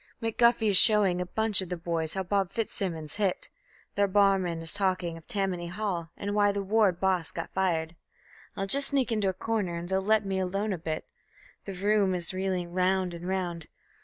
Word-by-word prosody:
McGuffy 230 Hz, 0 st, +2 dB
is 195 Hz, -, +8 dB
showing 200 Hz, -5 st, +5 dB
a 180 Hz, -, -4 dB
bunch 220 Hz, 0 st, +3 dB
of 185 Hz, -, -7 dB
the 180 Hz, -, -3 dB
boys 165 Hz, -1 st, -2 dB
how 190 Hz, -, -1 dB
Bob 195 Hz, 0 st, 0 dB
Fitzsimmons 185 Hz, -7 st, -4 dB
hit; 200 Hz, -4 st, -1 dB, 0.4 s
The 200 Hz, 0 st, +2 dB
barman 195 Hz, -4 st, +2 dB
is 165 Hz, -, +5 dB
talking 185 Hz, -4 st, -1 dB
of 165 Hz, -, -14 dB
Tammany 190 Hz, -4 st, -2 dB
Hall, 180 Hz, -3 st, -3 dB
and 200 Hz, 0 st, -4 dB
why 205 Hz, -1 st, +3 dB
the 200 Hz, 0 st, -3 dB
ward 200 Hz, -3 st, +2 dB
boss 185 Hz, -4 st, 0 dB
got 165 Hz, -, -7 dB
fired. 170 Hz, -3 st, -1 dB, 0.6 s
I'll 195 Hz, -, -1 dB
just 275 Hz, +8 st, +3 dB
sneak 270 Hz, -4 st, 0 dB
into 210 Hz, -3 st, +1 dB
a -, -, -2 dB
corner 200 Hz, -2 st, -2 dB
and 170 Hz, +1 st, -7 dB
they'll 190 Hz, 0 st, +1 dB
let 215 Hz, +1 st, +2 dB
me 190 Hz, -1 st, -2 dB
alone 195 Hz, +3 st, -2 dB
a 180 Hz, -, -5 dB
bit; 155 Hz, -1 st, -4 dB, 0.6 s
The 195 Hz, -, -6 dB
room 200 Hz, 0 st, +1 dB
is 175 Hz, 0 st, -2 dB
reeling 185 Hz, -2 st, -2 dB
round 185 Hz, 0 st, +1 dB
and 170 Hz, +1 st, -7 dB
round... 175 Hz, -4 st, -2 dB
190 Hz, 195 wpm, -28 LUFS, 175-205 Hz, 0.6 s, is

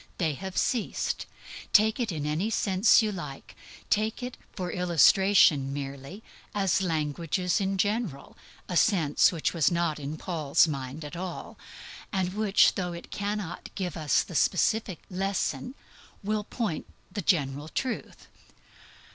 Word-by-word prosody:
They 160 Hz, -5 st, 0 dB
have 190 Hz, +6 st, -7 dB
ceased. 240 Hz, -4 st, -1 dB, 0.5 s
Take 220 Hz, +3 st, +5 dB
it 235 Hz, -5 st, -1 dB
in 150 Hz, -3 st, -3 dB
any 155 Hz, +8 st, 0 dB
sense 205 Hz, 0 st, +4 dB
you 215 Hz, -, 0 dB
like. 170 Hz, -8 st, -8 dB, 0.4 s
Take 215 Hz, +3 st, +1 dB
it, 250 Hz, 0 st, -5 dB, 0.2 s
for 180 Hz, -2 st, -4 dB
illustration 180 Hz, -4 st, +4 dB
merely, 140 Hz, +8 st, -6 dB, 0.3 s
as 195 Hz, -2 st, +2 dB
languages 165 Hz, +2 st, -1 dB
in 195 Hz, 0 st, 0 dB
general 205 Hz, -, -2 dB, 0.3 s
a 180 Hz, -, -4 dB
sense 165 Hz, -6 st, +4 dB
which 165 Hz, -4 st, -1 dB
was 165 Hz, -5 st, +3 dB
not 170 Hz, -3 st, 0 dB
in 145 Hz, +2 st, -5 dB
Paul's 160 Hz, -3 st, +2 dB
mind 140 Hz, +1 st, -5 dB
at 150 Hz, -, -8 dB
all, 180 Hz, 0 st, -6 dB, 0.6 s
and 185 Hz, -2 st, -1 dB
which 210 Hz, -1 st, +4 dB
though 180 Hz, -2 st, -3 dB
it 170 Hz, -, -10 dB
cannot 205 Hz, -3 st, -4 dB
give 185 Hz, -3 st, -3 dB
us 155 Hz, -4 st, +2 dB
the -, -, -11 dB
specific 190 Hz, +2 st, +1 dB
lesson, 195 Hz, +7 st, -2 dB, 0.5 s
will 210 Hz, +1 st, -1 dB
point 210 Hz, -11 st, -3 dB, 0.2 s
the 205 Hz, -, -3 dB
general 145 Hz, -4 st, 0 dB
truth. 250 Hz, -, -4 dB
180 Hz, 140 wpm, -28 LUFS, 155-205 Hz, 0.6 s, Take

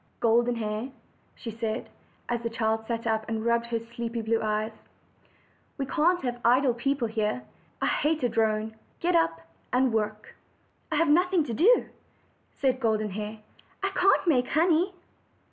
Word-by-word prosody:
''Golden 240 Hz, +1 st, +3 dB
Hair," 215 Hz, +3 st, -3 dB, 0.5 s
she 230 Hz, -, -7 dB
said, 225 Hz, +1 st, -3 dB, 0.4 s
as 240 Hz, -1 st, -1 dB
the 230 Hz, -, -2 dB
child 220 Hz, -1 st, -1 dB
sat 230 Hz, -1 st, -3 dB
up 220 Hz, -1 st, +1 dB
and 225 Hz, 0 st, -2 dB
rubbed 235 Hz, 0 st, +2 dB
her 235 Hz, -1 st, -1 dB
sleepy 230 Hz, 0 st, -5 dB
blue 225 Hz, +1 st, +1 dB
eyes, 215 Hz, +1 st, -1 dB, 1.1 s
''we 275 Hz, -, -1 dB
can't 340 Hz, +4 st, +2 dB
have 245 Hz, -1 st, -3 dB
idle 250 Hz, +2 st, +4 dB
people 270 Hz, +1 st, 0 dB
here. 220 Hz, +2 st, -1 dB, 0.4 s
I -, -, +3 dB
hate 305 Hz, -1 st, +1 dB
a 245 Hz, -, +3 dB
drone: 220 Hz, -1 st, 0 dB, 0.3 s
get 350 Hz, +1 st, +1 dB
up 165 Hz, -, +2 dB, 0.3 s
and 250 Hz, -1 st, +2 dB
work." 215 Hz, -1 st, -2 dB, 0.6 s
"I -, -, +1 dB
have 330 Hz, +2 st, +3 dB
nothing 355 Hz, +3 st, +4 dB
to 240 Hz, -, -4 dB
do," 425 Hz, -, +5 dB, 0.7 s
said 260 Hz, -2 st, +2 dB
Golden 215 Hz, -3 st, 0 dB
Hair; 215 Hz, +2 st, -5 dB, 0.4 s
"I 390 Hz, -, +1 dB
can't 390 Hz, +1 st, +3 dB
make 250 Hz, -6 st, +3 dB
honey." 335 Hz, +4 st, +3 dB
235 Hz, 160 wpm, -27 LUFS, 220-280 Hz, 1.1 s, do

